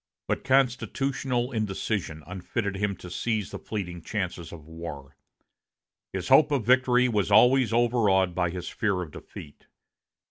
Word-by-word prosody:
But - - -1
constitutional 130 -1 0
indecision 100 - -3
unfitted 95 +3 -4
him 100 0 -1
to 90 -1 -11
seize 110 -1 -2
the - - -6
fleeting 90 -5 -5
chances 90 -3 -4
of 80 -3 -11
war. 80 -4 -9 1.0
His 95 -2 -4
hope 140 +3 +6
of 140 -7 0
victory 125 0 +4
was 105 -5 0
always 125 +3 +5
overawed 110 -6 +2
by 90 -1 0
his 90 0 -6
fear 100 -4 -1
of 80 - -10
defeat. 70 0 -12
105 Hz, 140 wpm, -27 LUFS, 90-125 Hz, 1.0 s, hope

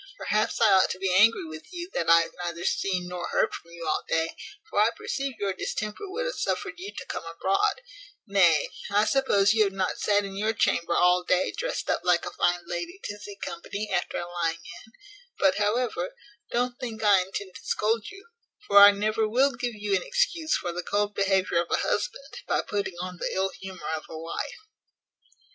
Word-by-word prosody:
Perhaps 215 +1 0
I 220 -3 +5
ought 190 -1 +5
to - - -3
be 190 -1 0
angry 210 +1 +5
with 155 0 -10
you, 350 -1 -5
that 165 - -1
I 165 0 +8
have 165 - -4
neither 170 0 -4
seen 180 -2 0
nor 180 -1 -4
heard - - +1
from 170 - -9
you 170 0 -8
all 155 - 0
day; 165 0 0 0.3
for 325 - -1
I 215 +2 +5
perceive 270 +3 -4
your 200 -2 -1
distemper 215 - -4
would 465 +6 -3
have - - -2
suffered 395 -6 -3
you 395 +3 -6
to - - -6
come - - -5
abroad: 415 +5 0 0.4
nay, 175 -8 +4 0.2
I 205 +1 +3
suppose 215 -6 +3
you 220 -1 +4
have 195 - -2
not 190 -1 -1
sat 205 -1 +2
in 195 0 -7
your 215 +3 0
chamber 170 -4 +1
all 180 0 +4
day 180 +1 +1
drest - - -3
up - - 0
like - - +2
a - - -5
fine 175 0 +1
lady 175 - -5
to 205 0 -6
see 205 -1 -9
company 210 +1 -5
after - - -1
a - - -3
lying 170 -2 -1 0.3
in; 220 - -22 0.5
but, 190 -1 +3
however, 245 - 0 0.3
don't 245 +1 -1
think 225 -3 -5
I 205 -2 +6
intend 190 +1 -6
to - - -14
scold 220 +1 0
you; 390 +2 -13 0.4
for 200 0 +7
I 200 0 +11
never 215 +2 +1
will 265 +5 +3
give 245 -2 -3
you 205 -1 0
an 185 - +1
excuse 345 -11 0
for 175 - -4
the 175 +1 -4
cold 205 +3 -1
behaviour 190 -3 +2
of 170 - -6
a - - +2
husband, - - -3
by - - +1
putting 200 -3 -3
on 180 0 -5
the - - -2
ill 190 +1 +1
humour 190 -2 -7
of 155 - -7
a 160 - -7
wife." 165 - -5
205 Hz, 210 wpm, -27 LUFS, 180-235 Hz, 0.5 s, I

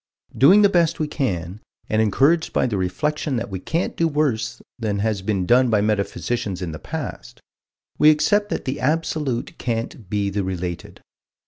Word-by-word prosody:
Doing 190 +10 +6
the - - +8
best 170 -4 +2
we 155 - 0
can, 95 - -3 0.3
and 110 0 +1
encouraged 140 +10 +2
by - - +2
the 120 -4 -1
reflection 135 - -1
that 115 -3 -3
we 95 - -4
can't 165 - -2
do 165 - +2
worse 120 -7 -1 0.2
than 105 -3 -1
has 105 -1 -1
been 95 -2 -1
done 125 +4 +4
by 105 -2 +3
metaphysicians 100 -1 -1
in 90 -3 -4
the 80 - -7
past, - - -7 0.6
we 150 - +7
accept 205 +7 +3
that - - -3
the 135 +2 -3
absolute 150 -4 -1
can't 115 -4 -4
be 100 -1 -1
the 100 0 -1
related. 90 -2 -5
115 Hz, 175 wpm, -22 LUFS, 100-150 Hz, 0.6 s, the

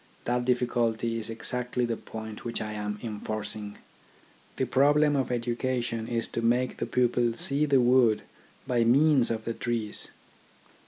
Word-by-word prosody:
That 125 0 0
difficulty 120 -2 0
is 110 - -5
exactly 125 +2 -2
the 115 -1 -1
point 110 -1 -8
which 120 - -3
I 110 0 -4
am 105 0 -3
enforcing. 105 -1 -5 0.8
The 130 - 0
problem 145 +4 +4
of 135 -2 0
education 120 -1 -2
is 115 -1 -2
to - - -3
make 120 +2 +1
the - - -3
pupil 120 -1 +2
see 140 +5 0
the 140 -2 +4
wood 120 -3 +4 0.4
by 120 -2 +2
means 135 +2 +4
of 110 -1 -3
the 115 - -2
trees. 115 -3 -2
120 Hz, 150 wpm, -28 LUFS, 115-125 Hz, 0.8 s, problem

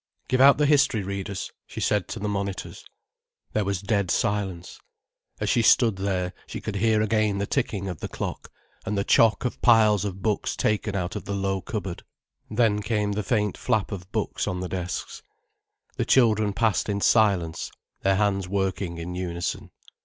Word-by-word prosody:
"Give 130 +1 +2
out 140 +1 +8
the 150 - +3
history 140 -7 +3
readers," 100 0 -4 0.2
she - - -7
said 105 -3 +1
to - - -6
the 105 -1 -3
monitors. 100 -1 -4 0.7
There 105 - +1
was 100 -1 -2
dead 100 -3 0
silence. 95 -4 -1 0.6
As - - -2
she 120 - +3
stood 115 -2 +4
there, 95 -2 -1
she - - -6
could 105 -2 -4
hear 110 0 +3
again 110 -2 +1
the 100 - -1
ticking 100 -6 -2
of 90 -5 -5
the - - -4
clock, - - -6 0.3
and 105 - -2
the 100 - +1
chock 110 +1 +4
of 125 - -3
piles 110 -4 +5
of 95 -2 -5
books 105 -2 0
taken 105 -1 0
out 90 -2 -2
of - - -5
the 100 - -3
low 95 -1 -1
cupboard. 100 -5 -5 0.5
Then 105 -2 +2
came 105 -1 0
the 105 +1 -1
faint 105 -1 0
flap 110 -5 0
of 95 -1 -7
books 110 -1 -2
on 90 -3 -2
the 90 -1 -4
desks. 90 -1 -4 0.8
The - - 0
children 110 -5 +4
passed 110 -1 +1
in 100 0 0
silence, 95 -8 +2 0.3
their 95 0 +3
hands 100 -2 +1
working 95 -2 -2
in 85 +2 -5
unison. 85 -1 -4
100 Hz, 180 wpm, -25 LUFS, 95-110 Hz, 0.8 s, out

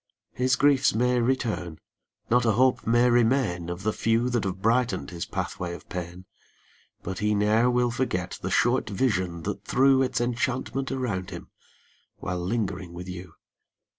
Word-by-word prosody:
5 - - -30
His 125 0 +3
griefs 140 -4 +3
may 125 +2 +2
return, 110 -10 -1 0.5
not 125 +1 +3
a 115 -2 +3
hope 130 +2 +2
may 120 +2 +4
remain 115 -8 +2
Of 85 +2 -5
the 110 0 0
few 115 +2 +1
that 120 -4 0
have 95 -1 -3
brighten 115 - +1
'd - - -10
his 85 -1 -5
pathway 85 -1 -4
of - - -13
pain, 90 0 -6 0.8
But 95 0 -5
he 105 0 +1
ne'er 110 +4 +3
will 125 -1 +2
forget 105 -8 -2
the - - -3
short - - +2
vision 95 -7 -1
that - - -4
threw 135 +1 +4
Its 130 -1 0
enchantment 125 +2 -2
around 115 -9 -2
him, - - -9 0.7
while 90 0 -4
lingering 95 -3 -3
with 90 +1 -8
you. 90 -2 -8
115 Hz, 165 wpm, -26 LUFS, 90-125 Hz, 0.8 s, may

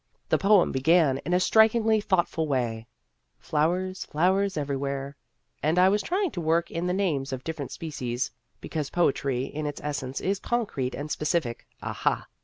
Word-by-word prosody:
The - - +3
poem 200 -2 +4
began 140 0 +3
in 175 - -5
a - - +4
strikingly 220 +2 +4
thoughtful 175 -5 +1
way, 120 -5 -1 0.3
" - - -49
Flowers, 180 +5 -1
flowers, 190 +4 +1
everywhere," 140 -1 -3 0.5
and 155 +4 +1
I 185 +1 +6
was 205 +1 +2
trying 370 - 0
to 175 - -4
work 165 +1 +1
in 170 +2 -2
the - - +1
names 165 -9 0
of 130 -1 -4
different 160 -4 -4
species 130 -6 -3 0.3
(because 150 -4 -3
poetry 135 -6 +1
in 150 +2 -4
its 145 - -5
essence 135 -3 -3
is 195 +1 -1
concrete 205 - -2
and 150 +2 -5
specific, 150 -6 -1 0.2
aha - - -1
160 Hz, 165 wpm, -27 LUFS, 140-185 Hz, 0.5 s, I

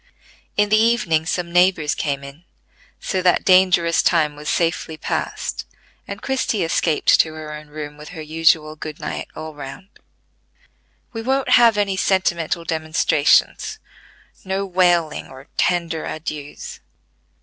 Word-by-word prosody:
In 210 0 +3
the 215 +1 +4
evening 190 -9 +2
some 170 -1 -2
neighbors 175 -4 +3
came 140 -2 -2
in; 140 +4 -11 0.6
so 190 - -2
that 180 -1 +2
dangerous 185 -3 +4
time 155 -4 +2
was 150 +1 -6
safely 165 -1 -1
passed, - - -4 0.4
and - - -7
Christie 255 -7 0
escaped 165 -1 +2
to 155 -1 +2
her 155 -1 -7
own 150 0 -9
room 150 0 -8
with 150 0 -11
her 165 -3 -8
usual 155 0 +2
quiet - - -33
good 155 -1 -7
night - - -5
all 155 0 -7
round. 145 +7 -9 1.2
"We 225 - -4
won't 265 +3 0
have 230 -3 +6
any 200 -2 0
sentimental 175 -4 0
demonstrations; 155 -2 +1 0.7
no 190 +1 -2
wailing, 175 -4 +1
or 135 +3 -14
tender 170 -3 0
adieux. 150 -2 -6
165 Hz, 140 wpm, -21 LUFS, 155-185 Hz, 1.2 s, have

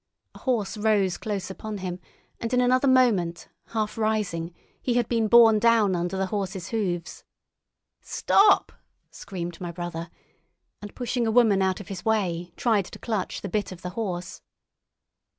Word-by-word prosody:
A - - -13
horse 220 -6 -1
rose 205 -4 +1
close 195 -3 -4
upon 215 +2 -6
him, 185 -2 -5 0.4
and 230 - -3
in - - +3
another 255 +2 +3
moment, 215 -11 +2 0.2
half 215 -1 -3
rising, 210 -6 -1 0.3
he 245 - 0
had 240 -2 +2
been 230 -2 +1
borne 225 -1 +7
down 225 -4 +4
under 175 +2 -2
the 190 - 0
horse's 190 -3 -3
hoofs. 180 -7 -3 0.8
"Stop!" 405 0 +3 0.4
screamed 175 -3 -7
my 175 -1 -4
brother, 170 -1 -5 0.7
and 205 -1 -9
pushing 245 -1 -1
a - - +1
woman 220 -4 +4
out 190 -1 +1
of 200 - -10
his 190 -3 -6
way, 180 -6 0
tried 215 -6 +2
to - - -10
clutch 215 -5 -3
the - - -4
bit 210 +1 -2
of 185 -1 -10
the 180 - -4
horse. 180 -5 -4
205 Hz, 160 wpm, -25 LUFS, 180-225 Hz, 0.8 s, borne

